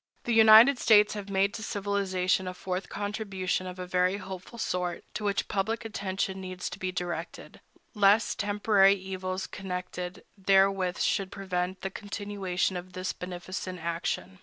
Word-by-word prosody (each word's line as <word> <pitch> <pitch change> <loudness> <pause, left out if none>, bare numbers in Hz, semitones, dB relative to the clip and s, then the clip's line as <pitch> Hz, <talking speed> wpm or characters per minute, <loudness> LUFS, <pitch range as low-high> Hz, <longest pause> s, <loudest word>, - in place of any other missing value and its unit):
The 240 - 0
United 225 +4 +8
States 210 -2 +5
have 205 -1 -6
made 195 +1 +2
to 230 - -6
civilization 190 -3 0
a 180 - -5
fourth 185 +1 -4
contribution 195 -3 -2
of 180 0 -7
a 180 - -5
very 180 +1 +1
hopeful 190 +3 -8
sort, 180 -5 -2
to - - -4
which 200 -1 0
public 220 +4 -1
attention 190 -2 -3
needs 185 -1 -5
to 180 - -8
be 185 0 -2
directed, 175 -1 -5 0.3
lest 210 +1 +3
temporary 205 -1 +4
evils 185 0 -4
connected 180 0 -6
therewith 195 -2 +3
should 195 -2 0
prevent 185 -1 -3
the 195 - -3
continuation 200 -3 -2
of 180 +1 -9
this 185 +1 -3
beneficent 180 +1 -6
action. 170 +3 -3
190 Hz, 150 wpm, -28 LUFS, 185-205 Hz, 0.3 s, United